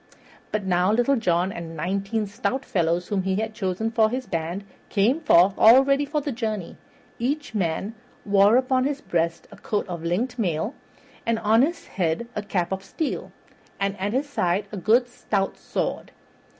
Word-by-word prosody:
But 215 -1 -1
now 180 +1 +2
Little 245 +5 +3
John 180 -5 +1
and 165 -3 -7
nineteen 195 +6 -1
stout 250 +6 -3
fellows 170 0 0
whom 200 -2 +1
he 190 0 -1
had 220 +2 -2
chosen 215 +1 -2
for 220 -1 +3
his 255 +2 -3
band, 170 +3 -3 0.3
came 225 +9 +2
forth 195 - +5
all 240 +5 +8
ready 280 +1 +2
for 300 +1 -1
the 285 - -3
journey. 215 -7 -3 0.4
Each 285 +3 -2
man 190 +1 -1 0.3
wore 205 +2 +5
upon 255 0 +2
his 285 0 -1
breast 170 - -1
a - - -12
coat 210 -1 -2
of 170 -3 -6
linked 235 +9 -1
mail, 175 - -1 0.5
and 230 0 +1
on 225 +1 +4
his 335 +5 0
head 175 +5 -1
a 210 - -1
cap 185 -4 -2
of 190 0 -3
steel, 310 +8 -4 0.5
and 200 0 0
at 200 +3 -1
his 275 +3 0
side 190 -7 0
a 210 - -5
good 230 +6 +3
stout 200 -5 -2
sword. - - -3
210 Hz, 175 wpm, -24 LUFS, 180-245 Hz, 0.5 s, all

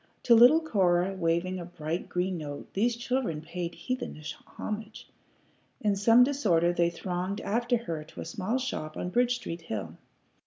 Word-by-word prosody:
To 240 - +6
little 245 +8 +8
Cora 190 - +2
waving 180 +1 0
a 175 - -6
bright 165 0 -4
green 180 0 -1
note 145 -2 -7
these 230 +4 +1
children 240 -8 -1
paid 170 +2 -5
heathenish 245 - -4
homage. 215 +1 -6 0.7
In 210 -2 +1
some 230 +5 +6
disorder 185 -11 +2
they 170 -1 +2
thronged 180 +3 -3
after 240 +3 +1
her 165 -9 -5
to - - -10
a - - -6
small 220 +2 -2
shop 155 -12 -4
on 180 - -3
Bridge 245 +4 +3
Street 170 -9 -6
hill. 95 - -5
185 Hz, 160 wpm, -29 LUFS, 170-235 Hz, 0.7 s, little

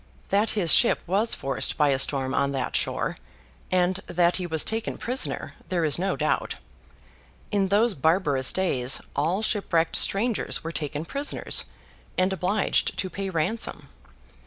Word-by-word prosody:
That 205 +2 +2
his 170 -6 +3
ship 235 - +4
was 200 +6 +1
forced 135 -1 +1
by 150 -2 +3
a 135 -1 +1
storm 135 -1 +1
on 140 0 0
that 135 - -3
shore, - - -1 0.5
and 185 0 +1
that 175 0 +2
he 180 -2 -3
was 160 -2 +4
taken 225 0 -3
prisoner, 250 +2 -1 0.2
there 175 -4 0
is 155 +2 +1
no 195 +2 0
doubt. - - -1 1.0
In 200 -2 +1
those 210 +4 +3
barbarous 150 -4 +2
days, 135 -9 +1 0.2
all 180 +8 0
shipwrecked 170 -7 +1
strangers 220 +3 +1
were 165 - -4
taken 150 0 -4
prisoners, 280 +10 -2 0.5
and 185 +1 +2
obliged 190 +2 0
to 185 -1 -2
pay 195 +2 -4
ransom. 185 +6 -3
180 Hz, 150 wpm, -25 LUFS, 155-200 Hz, 1.0 s, ship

